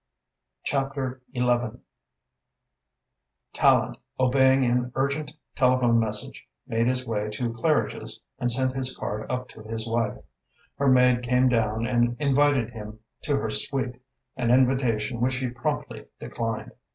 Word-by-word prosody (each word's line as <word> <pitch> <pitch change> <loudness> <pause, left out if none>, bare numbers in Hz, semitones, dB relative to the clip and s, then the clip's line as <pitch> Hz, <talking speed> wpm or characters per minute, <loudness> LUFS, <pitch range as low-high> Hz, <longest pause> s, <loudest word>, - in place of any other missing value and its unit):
CHAPTER 135 -2 -2
XI 125 - +1 2.1
Tallente, - - +3 0.2
obeying 130 +1 +4
an 125 0 +1
urgent 140 +2 -1 0.2
telephone 125 -2 +3
message, 105 -2 -3 0.2
made 115 +1 0
his 130 0 0
way 105 -2 -2
to 115 +2 -3
Claridge's 150 +6 -1 0.2
and 120 - 0
sent 130 +1 +2
his 130 -1 -2
card 105 +1 -4
up 125 0 -2
to - - -12
his 110 +1 -5
wife. 115 -2 0 0.6
Her 140 - +2
maid 125 -1 +5
came 125 +1 +3
down 110 -1 +1
and 120 0 +1
invited 140 -4 +2
him 105 -2 -8 0.3
to 145 -3 +1
her 110 -4 -2
suite, 125 +3 -2 0.3
an 125 -3 -1
invitation 125 -2 +2
which 125 +1 +1
he 130 -1 -2
promptly 120 0 -4
declined. 115 -1 -4
125 Hz, 130 wpm, -26 LUFS, 115-130 Hz, 2.1 s, maid